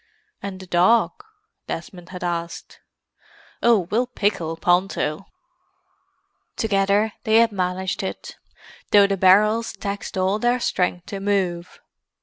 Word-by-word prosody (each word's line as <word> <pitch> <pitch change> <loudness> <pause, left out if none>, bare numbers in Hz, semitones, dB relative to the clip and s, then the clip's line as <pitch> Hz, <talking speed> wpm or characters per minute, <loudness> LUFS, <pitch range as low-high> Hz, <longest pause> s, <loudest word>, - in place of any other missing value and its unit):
"And 195 -2 -6
the 190 - -10
dog?" 185 +6 +3 0.6
Desmond 175 +1 -7
had 180 -1 -8
asked. 170 -1 -5 0.8
"Oh, 230 -4 +4
we'll 240 +4 +1
pickle 195 -9 -2
Ponto." 180 -1 0 1.3
Together 200 0 +1
they 220 - +2
had 230 0 +5
managed 185 -1 -2
it, 190 - -6 0.5
though 205 -1 +6
the 200 0 0
barrels 210 +5 +3
taxed 200 -1 -5
all 190 +3 +1
their 240 +2 +1
strength 180 -5 -1
to 200 - -6
move. 190 -3 -2
195 Hz, 120 wpm, -22 LUFS, 180-210 Hz, 1.3 s, though